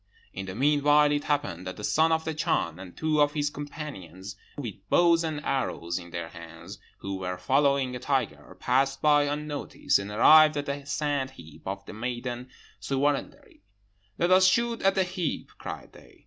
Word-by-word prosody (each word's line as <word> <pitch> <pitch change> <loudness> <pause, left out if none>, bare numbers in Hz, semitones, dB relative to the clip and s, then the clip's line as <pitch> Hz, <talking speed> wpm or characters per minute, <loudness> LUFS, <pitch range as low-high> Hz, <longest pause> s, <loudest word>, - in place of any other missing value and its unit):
"In 95 +1 -6
the 95 - -6
meanwhile 145 +3 +4
it 145 0 -1
happened 140 - -2
that 90 - -6
the 105 - -8
son 160 +8 +3
of 160 0 +1
the 160 - -2
Chan 90 - -1
and 90 -2 -11
two 155 -1 +1
of 145 0 +3
his 145 -1 -1
companions, 135 - -8 0.2
with 120 -8 -4 0.2
bows 170 -1 +4
and 155 -2 -4
arrows 85 -10 -2
in 85 -1 -11
their 85 -1 -5
hands, 85 +3 -11 0.2
who 95 0 -4
were 90 -1 -4
following 135 +6 +2
a - - -5
tiger, 130 -2 -2
passed 135 +2 +1
by 145 -1 +5
unnoticed, 145 -4 -1
and 100 +1 -6
arrived 155 +8 +6
at 145 - -2
the 140 0 -5
sand 145 -1 -1
heap 80 - -14
of - - -5
the - - -9
maiden 120 +2 -4 0.3
Ssuwarandari. 140 +1 -2 0.6
'Let 175 +2 +1
us 185 0 +7
shoot 235 +4 +1
at 195 0 +3
that 190 -2 +1
heap!' 180 -5 -3
cried - - -8
they. - - -18
140 Hz, 180 wpm, -27 LUFS, 100-150 Hz, 0.6 s, us